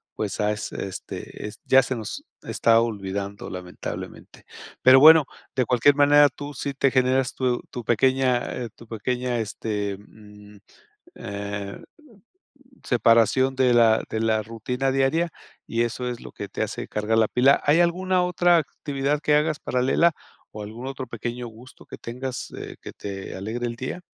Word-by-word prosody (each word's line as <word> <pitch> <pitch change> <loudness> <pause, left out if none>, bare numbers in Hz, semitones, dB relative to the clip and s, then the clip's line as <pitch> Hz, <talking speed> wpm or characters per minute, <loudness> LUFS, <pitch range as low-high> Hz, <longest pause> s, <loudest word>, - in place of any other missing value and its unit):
pues, 105 -2 -4
as 105 0 -1
este 100 +2 -7
ya 135 0 +6
se 130 - -3
nos 110 -3 -6 0.2
está 115 0 +3
olvidando, 100 -2 -4
lamentablemente. 90 -1 -8 0.4
Pero 130 +1 +8
bueno, 155 +1 +9 0.3
de 130 - +2
cualquier 125 +4 +4
manera, 145 +1 +6
tú 145 +3 -9
sí 140 +2 -4
te 135 0 +2
generas 130 -1 +1
tu 125 -2 0
tu 120 - -6
pequeña, 130 +2 +2 0.2
eh, 120 -2 -4
tu 115 - -15
pequeña, 125 +3 -2
este, 105 -2 -3
mm, 105 0 -16 0.6
eh, 100 0 -6 1.0
separación 125 +2 +3
de 130 -2 +3
la 115 -2 +4
de 110 - -1
la 110 -1 +1
rutina 125 +4 -2
diaria 135 +6 +1 0.3
y 115 - -1
eso 120 +1 -2
es 120 -1 -4
lo - - -10
que - - -7
te - - -5
hace - - -3
cargar 105 +1 -1
la 110 -1 +4
pila. 135 +5 +4
¿Hay 150 +3 +4
alguna 180 +2 +2
otra 175 -1 +3
actividad 145 -1 -2
que 150 - +2
hagas 150 0 +1
paralela 130 +7 +2 0.4
o 105 - -7
algún 115 +5 -8
otro 135 -1 -5
pequeño 120 +1 -5
gusto 115 +3 -15
que - - -10
tengas, 125 +2 -6
eh, - - -8
que - - -9
te 95 -1 -7
alegre 110 +6 -4
el 115 - -5
día? 130 +8 -5
125 Hz, 160 wpm, -24 LUFS, 110-135 Hz, 1.0 s, bueno